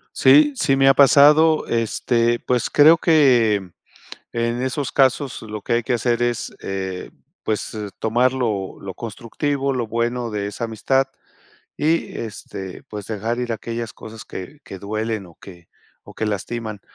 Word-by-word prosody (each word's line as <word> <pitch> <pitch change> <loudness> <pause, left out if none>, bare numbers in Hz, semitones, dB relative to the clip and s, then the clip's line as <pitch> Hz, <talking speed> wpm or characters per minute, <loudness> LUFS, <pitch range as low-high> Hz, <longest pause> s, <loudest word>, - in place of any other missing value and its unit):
Sí, 295 0 +6
sí 135 - +2
me 135 0 +5
ha - - +7
pasado, 150 +3 +6
este, 115 +1 +1
pues, 125 -1 -1
creo 155 +3 +6
que 120 - +3 0.6
en 115 +1 -1
esos 130 +2 -2
casos 135 -1 +1
lo 105 -1 -7
que - - -1
hay 120 0 +1
que 125 - -1
hacer 120 0 0
es, 120 -1 -2
eh, 95 -1 -5 0.3
pues, 110 0 -3 0.2
tomar 120 +3 +2
lo 110 -7 -2
lo 95 -1 -7
constructivo, 135 +6 -3
lo 120 -3 -2
bueno 120 +1 -2
de 105 -2 -3
esa 105 +4 -4
amistad 130 +4 0 0.7
y, 160 +2 0
este, 100 -4 -7
pues, 105 -2 -8
dejar 110 +2 -3
ir 120 -1 -2
a - - -2
aquellas 115 +1 -5
cosas 110 0 -11
que 140 +11 -9
que 95 - -9
duelen 110 +1 -3
o 85 - -17
que 85 -2 -15 0.3
o - - -14
que 110 - -3
lastiman, 110 +1 -4
115 Hz, 160 wpm, -21 LUFS, 105-130 Hz, 0.7 s, ha